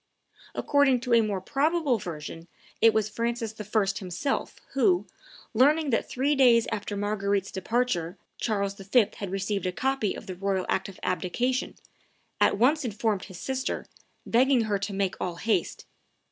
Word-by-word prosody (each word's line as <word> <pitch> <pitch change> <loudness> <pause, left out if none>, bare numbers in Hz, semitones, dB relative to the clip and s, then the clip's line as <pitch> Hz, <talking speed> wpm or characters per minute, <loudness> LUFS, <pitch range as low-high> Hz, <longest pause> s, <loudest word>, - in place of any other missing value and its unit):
According 285 -3 +3
to 250 -1 -1
a 230 - +7
more 210 -3 -1
probable 285 - +1
version, 165 -1 -7 0.3
it 225 - +7
was 220 -1 +1
Francis 230 +1 -2
I. 210 0 +1
himself 190 +8 -2 0.2
who, 355 +7 +3 0.5
learning 290 +5 +4
that 225 - 0
three 275 +4 +1
days 245 -5 +5
after 205 0 -3
Marguerite's 200 -1 -1
departure 190 -4 -1 0.2
Charles 200 -3 0
V. 200 +3 +2
had 200 - -4
received 195 0 -2
a - - 0
copy 265 0 0
of - - -9
the 185 - -5
royal 190 0 -1
act 190 +1 -1
of 190 - -12
abdication, 240 +9 -1 0.6
at - - +4
once 280 +8 +3
informed 215 -4 -1
his 185 -3 -10
sister, 265 0 -3 0.4
begging 255 +1 +4
her 210 -3 0
to 205 +1 -3
make 195 -1 -1
all 175 -2 -2
haste. 215 +6 -1
215 Hz, 155 wpm, -27 LUFS, 195-255 Hz, 0.6 s, a